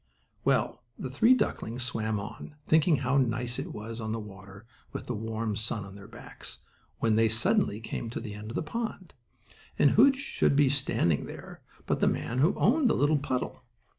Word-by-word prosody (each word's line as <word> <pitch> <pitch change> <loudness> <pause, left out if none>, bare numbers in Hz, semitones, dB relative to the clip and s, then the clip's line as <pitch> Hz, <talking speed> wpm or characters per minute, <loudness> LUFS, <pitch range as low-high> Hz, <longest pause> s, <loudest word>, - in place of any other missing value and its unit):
Well, - - +1 0.2
the 130 - -5
three 225 - +5
ducklings 120 - -2
swam 110 -3 -1
on, 105 +8 -8
thinking 160 +1 +5
how 130 +1 +1
nice 120 -1 -1
it - - -5
was 110 +2 -6
on 110 0 -3
the 115 - -2
water, 100 0 -11 0.3
with - - -5
the 125 - -3
warm 110 0 -3
sun 105 0 -2
on 95 - -11
their 100 0 -11
backs, - - -10 0.4
when 110 -1 +2
they 115 0 +4
suddenly 110 - +2
came 115 +1 -5
to 115 - -4
the 110 -3 -6
end 105 +1 -8
of 115 - -6
the - - -1
pond. 210 +1 -5 0.6
And 145 - +5
who 270 +6 +7
should 270 - 0
be 140 -1 +5
standing 120 - +1
there - - -10 0.2
but - - 0
the - - +3
man 120 +2 -1
who 155 +7 +4
owned 260 +3 +3
the - - +3
little 145 +1 +3
puddle. 130 -2 -3
120 Hz, 195 wpm, -29 LUFS, 110-145 Hz, 0.6 s, who